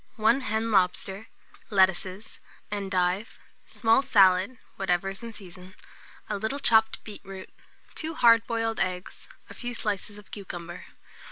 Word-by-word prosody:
1 230 +4 +3
hen 220 -1 -1
lobster, 195 +1 +1 0.4
lettuces, 190 +1 +1 0.3
endive, 190 0 -1 0.3
small 225 +2 +3
salad 195 -3 +4 0.2
(whatever 190 0 0
is 195 +3 -7
in 230 -1 -7
season), 185 -2 -11 0.5
a 205 -1 -3
little 220 +7 -2
chopped 220 -5 +3
beetroot, 195 -2 -9 0.4
2 320 0 -3
hard 230 -3 +5
boiled 225 -1 -1
eggs, 180 0 -3 0.2
a - - -11
few 245 -1 -4
slices 205 -1 -2
of 210 - -15
cucumber. 175 -3 -7
205 Hz, 125 wpm, -27 LUFS, 190-225 Hz, 0.5 s, hard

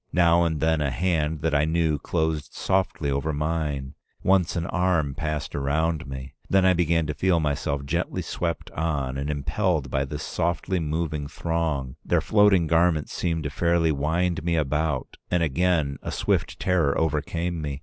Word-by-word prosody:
Now 85 -1 +4
and 80 -2 -1
then 80 0 +2
a 70 - +1
hand 80 0 0
that 80 -1 0
I 75 0 +3
knew 80 -2 +1
closed 80 -1 -1
softly 95 -6 0
over 70 +3 -1
mine; 75 -3 -2 0.3
once 95 -2 +3
an 85 -1 -1
arm 85 -6 +1
passed 75 0 -3
around 80 +3 0
me. 65 0 -7 0.2
Then 95 -1 +4
I 95 - +6
began 85 -2 +2
to 75 - -2
feel 85 +4 +2
myself 70 -2 -1
gently - - -2
swept 85 -2 -3
on 70 -5 -2
and 70 +2 -3
impelled 75 - -1
by 70 +1 +1
this 75 +3 -5
softly 85 +2 -1
moving 75 -2 -2
throng; 80 -5 -2
their - - +2
floating 105 -5 +4
garments 80 -1 +2
seemed 85 -2 -1
to 70 - -3
fairly 85 +2 +2
wind 80 +4 0
me 85 0 +1
about, 75 -2 -1
and 90 -1 +2
again 80 -2 +1
a - - -5
swift - - -1
terror 85 -7 +2
overcame 80 +2 -1
me. 70 -2 -4
80 Hz, 170 wpm, -25 LUFS, 75-85 Hz, 0.3 s, I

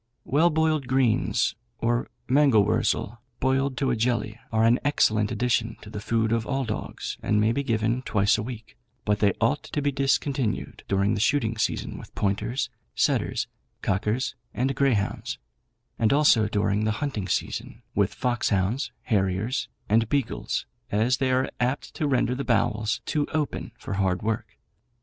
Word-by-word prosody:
Well 160 +5 +4
boiled 155 -3 +1
greens 125 -2 +2 0.2
or 120 +1 0 0.2
mangel 130 -6 +5
wurzel 115 +3 0 0.2
boiled 135 0 +1
to 135 0 +1
a - - +1
jelly 115 -1 -1
are 110 0 +2
an 120 +2 +4
excellent 110 -7 +2
addition 115 -1 0
to 105 - -10
the 105 - -5
food 110 0 +1
of 115 -1 0
all 135 -1 0
dogs, 110 - -5
and 105 - +2
may 110 +1 +3
be 140 - 0
given 115 -1 0
twice 105 -5 +2
a - - -1
week; 115 0 -8 0.3
but 105 0 +1
they 100 -2 +3
ought 135 +6 +2
to - - -4
be 145 0 +1
discontinued 135 -3 0
during 100 +1 +2
the - - -1
shooting 115 -1 +2
season 115 - -2
with - - -13
pointers, 105 +7 -1 0.2
setters, - - +1 0.4
cockers, 105 +6 0 0.2
and 130 +3 +1
greyhounds; 130 -7 0 0.6
and 110 - +3
also 140 -7 +5
during 105 0 +1
the 110 0 +1
hunting 120 -10 -2
season 110 +4 -3
with 100 -2 +2
foxhounds, 120 -1 0
harriers, 100 +4 0 0.2
and 110 +1 +3
beagles, 140 -5 -1 0.3
as 115 +5 +2
they 135 -1 +1
are 130 +1 +2
apt 125 +3 -1
to 150 - -1
render 125 -2 +2
the 135 +2 -3
bowels 110 -2 +1
too 150 -1 0
open 155 -3 -2
for - - -6
hard 95 -1 0
work. 110 0 -3
115 Hz, 160 wpm, -26 LUFS, 105-135 Hz, 0.6 s, mangel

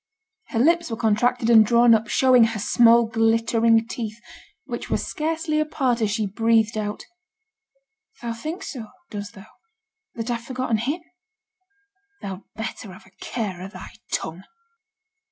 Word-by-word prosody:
Her 230 - -4
lips 335 +6 +3
were 225 - -4
contracted 230 +2 +1
and 220 -2 +8
drawn 235 +2 +5
up, 225 +1 +2
showing 255 -2 +5
her 225 -1 -3
small 235 +3 +5
glittering 225 0 +2
teeth, 225 -2 -5 0.5
which - - -6
were - - +1
scarcely 315 0 -2
apart 265 -6 0
as 215 - +1
she 215 +1 -1
breathed 225 +2 +2
out 210 -1 -4 1.1
'Thou 235 -1 -4
thinks 310 +10 -6
so, 235 -6 -7 0.2
does 205 -1 -5
thou, 195 +1 -13 0.7
that 230 +1 -3
I've 235 -1 -2
forgetten 255 -2 -1
him? 280 +10 -2 1.2
Thou'd 195 -1 -6
better 220 -2 -6
have 185 - -14
a 190 - -21
care 200 -7 -4
o' 185 - -6
thy 190 -1 -10 0.2
tongue.' 165 +3 -3
230 Hz, 145 wpm, -23 LUFS, 215-245 Hz, 1.2 s, and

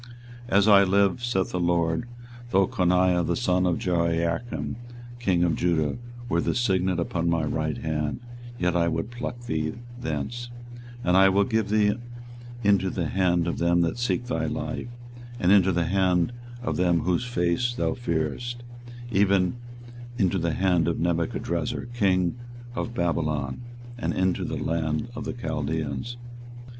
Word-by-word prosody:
24:022:024 100 - +3
As 100 +1 +4
I 100 -2 +8
live, 100 +4 +2
saith 105 -6 0
the 90 - -2
LORD, 85 +4 +1 0.4
though 95 -3 +3
Coniah 90 -5 +2
the - - 0
son 90 -6 +1
of 85 - +1
Jehoiakim 85 -2 -1 0.4
king 95 -7 +2
of 85 -3 +2
Judah 85 +2 0 0.3
were - - +1
the - - 0
signet 95 -6 +1
upon 85 0 -1
my 85 -1 +1
right 80 0 -1
hand, 75 -2 -2 0.4
yet 90 -3 +1
would 85 -1 +1
I 120 +2 -13
pluck 120 0 -5
thee 80 -9 -2 0.3
thence; 120 0 -4 0.2
24:022:025 120 0 -12 0.2
And 90 +1 +3
I 95 0 +7
will 100 +1 +3
give 110 -2 0
thee 105 0 +3 0.7
into 100 -2 +3
the 85 -4 -2
hand 90 -3 +2
of 85 - -2
them 85 +1 +3
that 85 +7 0
seek 120 0 0
thy 80 -8 -1
life, - - -4 0.5
and 90 -3 +3
into 95 -2 +6
the 85 -1 +1
hand 90 +2 +2 0.3
of - - -1
them 85 -2 +3
whose 90 +6 +1
face 120 +2 0
thou - - 0
fearest, 120 - -3 0.5
even 95 0 +3 0.6
into 95 -4 +2
the 85 -1 0
hand 90 -4 +2
of 85 - 0
Nebuchadrezzar 85 -1 -1
king 95 -2 +1 0.3
of 120 0 -4
Babylon, 75 - -1 0.4
and - - -1
into 95 -1 +1
the - - -3
hand 80 +5 -1
of 120 -2 -6
the - - -3
Chaldeans. 80 - -3
90 Hz, 155 wpm, -26 LUFS, 85-105 Hz, 0.7 s, I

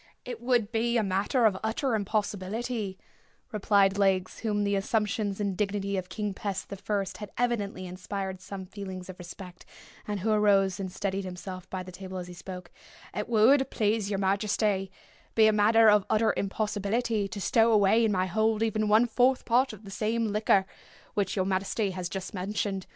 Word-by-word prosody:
"It 245 -2 -6
would 240 -3 +1
be 235 +1 +1
a 225 - +2
matter 200 +6 +1
of 195 -3 +3
utter 230 +4 0
impossibility," 210 0 -2 0.5
replied 200 -1 +3
Legs, 190 -2 +1
whom 210 -2 0
the 200 0 +1
assumptions 210 -1 -1
and 200 -2 -1
dignity 200 0 -1
of 185 -1 -3
King 210 -2 -3
Pest 195 -1 -4
the 200 - -5
First 200 0 -3
had 210 -2 -7
evidently 210 -6 -1
inspired 185 +1 -5
some 190 0 -7
feelings 190 -1 -8
of 185 - -17
respect, 180 +1 -10 0.4
and 205 -2 -3
who 220 +3 +1
arose 200 -3 +3
and 190 -2 -4
steadied 195 +1 -2
himself 185 0 -7
by 185 -1 -4
the 185 - -10
table 185 +1 -7
as 180 - -4
he 180 - -9
spoke—"it 180 +4 -9
would, 260 +5 +5
please 210 -1 0
your 200 - -1
majesty, 195 0 +1 0.5
be 220 - +6
a 215 - +5
matter 220 +2 +5
of 210 -1 +6
utter 220 +1 +3
impossibility 210 +2 -1
to 205 +1 -7
stow 225 +3 +3
away 215 +1 +4
in 220 - +3
my 185 -2 +1
hold 220 +4 +1
even 215 -1 0
one 220 +3 +6
fourth 250 +2 +2
part 250 +3 +3
of 215 -1 -12
the 195 - -9
same 225 +2 0
liquor 205 -2 +3 0.5
which 200 -2 -1
your 190 -2 +1
majesty 195 +2 0
has 180 -1 -4
just 190 -1 -5
mentioned. 195 0 -3
205 Hz, 180 wpm, -28 LUFS, 190-220 Hz, 0.5 s, be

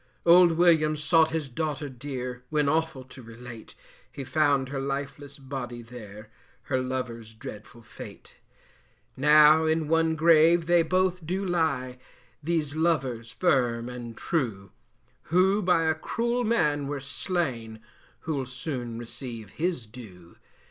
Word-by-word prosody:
Old 170 0 +7
Williams 155 -3 +3
sought 160 0 +4
his 160 -3 -3
daughter 150 +2 -3
dear, 125 -1 -6
When 150 -2 +1
awful 160 -2 0
to 130 +1 -13
relate, 115 0 -11 0.4
He 140 - -7
found 140 -2 +1
her 140 -1 -4
lifeless 140 +1 -5
body 130 -3 -6
there, 110 -2 -11 0.3
Her 130 -3 -1
lover's 120 -4 -5
dreadful 110 +2 -10
fate. 110 - -12 0.8
Now 150 +3 +6
in 160 -1 +1
one 165 0 +2
grave 165 +1 +5
they 175 0 +4
both 185 +1 0
do 190 +3 -2
lie, 160 -8 -1 0.4
These 155 -2 -1
lovers 135 -8 0
firm 125 -7 +1
and 120 -2 -8
true, 110 - -2 0.5
Who 190 +5 +3
by 180 -3 +2
a 160 0 +2
cruel 235 +9 -2
man 150 -11 +1
were 145 0 -3
slain, 135 - -3 0.4
Who'll 140 -5 -3
soon 125 -3 -5
receive 120 -3 -8
his 165 -7 -2
due. 105 -7 -13
140 Hz, 130 wpm, -27 LUFS, 125-160 Hz, 0.8 s, Old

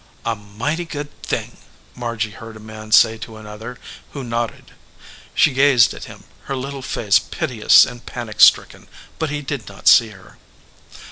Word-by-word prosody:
"A 115 - 0
mighty 110 +12 -4
good 145 -2 -6
thing," - - -4 0.4
Margy 115 -3 -3
heard 110 +1 -11
a - - -13
man 110 0 -11
say 110 0 +5
to 110 0 -9
another, 110 +3 -9 0.4
who 140 - -6
nodded. 115 -1 -4 0.6
She 150 - +4
gazed 135 -3 +4
at - - -9
him, - - -13 0.2
her 135 - -3
little 135 +1 -5
face 105 -5 +2
piteous 125 -10 +3
and 120 -1 -10
panic 115 -3 -6
stricken, - - +5 0.3
but 160 - -1
he 145 0 -4
did 135 -7 -5
not 100 -1 -9
see 115 - +7
her. 100 0 -17
115 Hz, 160 wpm, -20 LUFS, 110-135 Hz, 0.6 s, see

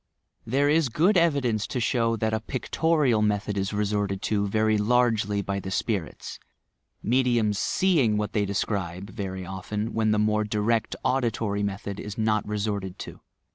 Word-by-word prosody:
There 135 +5 +2
is 155 -2 +3
good 175 - +3
evidence 140 - +2
to 125 - -3
show 115 0 +1
that 110 0 -1
a 110 - +1
pictorial 130 +1 +1
method 105 -1 0
is 95 -1 -1
resorted 105 -2 -1
to 100 -1 0
very 110 +1 +2
largely 105 -2 +2
by 100 0 -2
the 95 - -6
spirits— 95 -4 -3 0.6
mediums 120 -4 +2
seeing 145 - +2
what 105 0 -2
they 105 -1 +1
describe, 100 -2 -3
very 95 -3 -5
often, 105 +4 -4
when 110 -1 +1
the 105 - +2
more 105 0 +2
direct 105 +2 0
auditory 115 -5 0
method 100 0 -4
is 105 -1 -7
not 110 -1 +1
resorted 100 -3 -3
to. - - -8
105 Hz, 155 wpm, -26 LUFS, 100-120 Hz, 0.6 s, is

